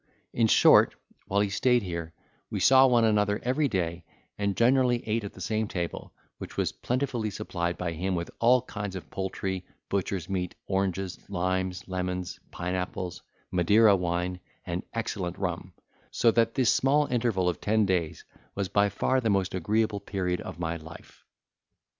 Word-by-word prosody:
In 115 -1 +3
short, - - +6 0.3
while 100 +1 +2
he 100 -1 0
stayed 125 +3 +3
here, 85 -3 -4 0.4
we - - -3
saw 135 0 +7
one 120 -2 +4
another 105 -1 +2
every 135 +4 +1
day, 85 -6 -2 0.3
and 100 -1 -1
generally 125 0 +3
ate 110 +1 0
at 100 - -6
the 95 - -12
same 110 +3 -1
table, 85 -3 -4 0.3
which - - -9
was - - +1
plentifully 125 -3 -2
supplied 85 -3 -3
by 90 -2 -2
him 90 +3 -2
with 85 0 -4
all 125 +2 +4
kinds 100 -5 -5
of 90 - -8
poultry, 95 -1 -3 0.3
butcher's 95 -3 -2
meat, 90 -2 -3
oranges, 95 -1 -1
limes, 95 -1 -2
lemons, 90 -1 -3
pine 90 +1 -4
apples, 90 -1 -4 0.3
Madeira 100 +4 +5
wine, 90 0 -2 0.3
and 85 +1 -3
excellent 100 -6 -3
rum; 90 -1 -3 0.4
so 115 - +3
that 115 0 +2
this 130 -4 +4
small 145 +3 +3
interval 115 -8 0
of 90 - -1
ten 110 0 +2
days 90 -4 -1 0.3
was 95 -2 -2
by 100 0 +3
far 130 +6 +1
the 115 - 0
most 95 -2 +1
agreeable 105 +3 0
period 95 -3 -2
of - - -7
my 85 -1 -2
life. 80 0 -13
95 Hz, 165 wpm, -28 LUFS, 90-110 Hz, 0.4 s, saw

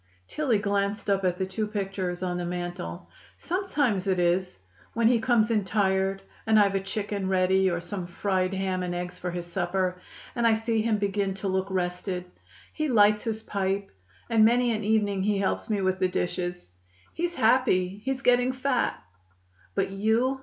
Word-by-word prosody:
Tillie 270 -8 +1
glanced 200 0 -1
up 195 0 +1
at 180 -1 +1
the 190 - -1
two 210 +3 -3
pictures 195 -3 -3
over 180 -1 -1
the 175 - -3
mantel. 175 - -5 0.3
"Sometimes 290 - 0
it 190 -1 +2
is 180 - +1 0.3
when 230 -1 +3
he 235 0 +4
comes 230 -2 +3
in 215 -3 +2
tired, 195 -1 0 0.2
and 220 -1 +5
I've 200 -1 +4
a 195 - +1
chicken 200 0 -3
ready 190 0 +3
or 170 -1 -1
some 180 0 -5
fried 185 +1 0
ham 190 -1 -1
and 175 -1 -3
eggs 180 0 -5
for 180 - -3
his 175 0 -4
supper, 180 +1 -1 0.3
and 235 -1 +2
I 225 - +5
see 225 0 0
him 220 -1 +1
begin 200 -1 -1
to 195 +1 -4
look 190 0 0
rested. 180 0 -2 0.5
He 310 -1 -1
lights 210 -4 +4
his 220 -1 -3
pipe, 195 -1 -2 0.4
and 225 -1 +4
many 240 +2 +4
an 215 -1 -3
evening 205 -2 +1
he 205 +1 +1
helps 195 +3 -1
me 210 -2 0
with 185 0 0
the 185 - +3
dishes. 175 - -3 0.4
He's 345 +1 -2
happy; 220 - +2
he's 265 0 -2
getting 245 +1 +3
fat." 260 -1 0 0.8
"But 195 -1 0
you?" 225 +7 +1
195 Hz, 180 wpm, -27 LUFS, 185-220 Hz, 0.8 s, and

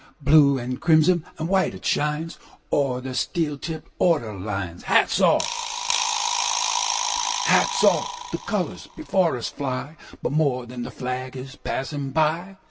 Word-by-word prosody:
Blue 140 -1 +5
and 125 0 -5
crimson 160 +1 +4
and 160 - -3
white 190 - +1
it 95 - -11
shines, 150 +3 -1 0.3
Over 130 -3 +1
the 130 0 -6
steel 150 +1 -1
tipped, 160 0 -6
ordered 115 - +1
lines. 95 -4 -5
Hats - - +3
off! - - +4 2.8
The - - -3
colors - - -3
before 190 - +1
us 120 - -4
fly; 140 +3 -5 0.3
But - - -1
more 140 -5 +1
than 120 0 -8
the - - -5
flag 130 +1 -5
is 135 +2 -8
passing 140 +1 -4
by. 160 +6 0
140 Hz, 130 wpm, -23 LUFS, 125-160 Hz, 2.8 s, Blue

